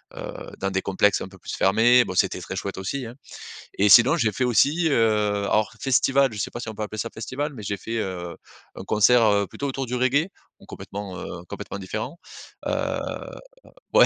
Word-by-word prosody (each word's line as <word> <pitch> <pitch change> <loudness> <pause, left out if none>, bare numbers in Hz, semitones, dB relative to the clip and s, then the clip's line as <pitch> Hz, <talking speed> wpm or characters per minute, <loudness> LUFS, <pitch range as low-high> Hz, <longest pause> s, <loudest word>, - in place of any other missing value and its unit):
heu, - - -6 0.3
dans 100 0 -1
des 95 0 0
complexes 100 +1 +2
un - - -5
peu 95 0 -15
plus - - -8
fermés. 115 +5 +5
Bon 90 - -5
c'était - - +1
très - - -6
chouette - - -4
aussi, 125 +8 -3
hein. 115 +1 -9 0.6
Et 100 - +4
sinon 120 - +7
j'ai 115 -10 +1
fait 130 - -1
aussi, 145 - +3
heu, 105 -4 +2
alors, 110 0 +2
festival, 135 +1 +3
je 105 - -7
sais 100 - -2
pas 120 - -6
si 115 - -6
on 110 - -5
peut 110 - -5
appeler 110 +1 -5
ça 115 - -2
festival, 135 +6 -4
mais 110 - -8
j'ai 100 0 -3
fait, 115 +4 -5
heu, 90 -4 -4 0.4
un - - -8
concert, 110 +4 +4
heu, 100 -2 +3
plutôt 140 - -5
autour 135 0 -3
du 125 - -4
reggae, 130 +7 +2 0.3
bon - - -18
complètement, 100 -2 -7
heu, 85 0 -7
complètement - - -6
différent, 100 - -5 0.5
heu, - - 0 1.2
ouais, - - +8
110 Hz, 210 wpm, -24 LUFS, 100-125 Hz, 1.2 s, ouais